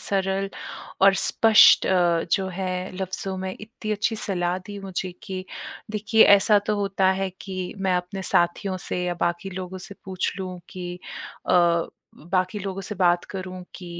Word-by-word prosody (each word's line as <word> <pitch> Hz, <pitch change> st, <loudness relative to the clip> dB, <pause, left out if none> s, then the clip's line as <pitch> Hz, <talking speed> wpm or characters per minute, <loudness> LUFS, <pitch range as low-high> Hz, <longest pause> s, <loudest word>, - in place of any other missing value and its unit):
सरल 195 Hz, 0 st, 0 dB, 0.5 s
और 195 Hz, 0 st, +7 dB
स्पष्ट 225 Hz, -1 st, +6 dB
अ, 175 Hz, -3 st, +3 dB
जो 190 Hz, -1 st, +2 dB
है 185 Hz, 0 st, -3 dB
लफ्जों 190 Hz, 0 st, -4 dB
में 185 Hz, 0 st, -4 dB
इत्ती 215 Hz, 0 st, -5 dB
अच्छी 215 Hz, +2 st, 0 dB
सलाह 180 Hz, -4 st, 0 dB
दी 205 Hz, -1 st, -7 dB
मुझे 190 Hz, -1 st, -4 dB
कि 185 Hz, -1 st, -5 dB, 0.5 s
देखिए 220 Hz, +1 st, +4 dB
ऐसा 205 Hz, +1 st, +6 dB
तो 210 Hz, -, +1 dB
होता 195 Hz, -2 st, +2 dB
है 195 Hz, -, 0 dB
कि 185 Hz, -2 st, -5 dB
मैं 190 Hz, -1 st, +1 dB
अपने 180 Hz, +2 st, -4 dB
साथियों 180 Hz, +2 st, +1 dB
से 180 Hz, -, -2 dB
या 175 Hz, -, -1 dB
बाकी 175 Hz, +3 st, -1 dB
लोगों 185 Hz, 0 st, -6 dB
से 195 Hz, +2 st, -7 dB
पूछ 190 Hz, -1 st, -2 dB
लूँ 185 Hz, -1 st, -5 dB
कि 180 Hz, -1 st, -6 dB, 0.5 s
अ, -, -, +3 dB, 0.6 s
उ -, -, -16 dB
बाकी 185 Hz, +2 st, +1 dB
लोगों 195 Hz, 0 st, -4 dB
से 210 Hz, -, -5 dB
बात 175 Hz, -1 st, +2 dB
करूँ 185 Hz, -1 st, -6 dB
कि 180 Hz, -, -9 dB
190 Hz, 165 wpm, -24 LUFS, 180-195 Hz, 0.6 s, और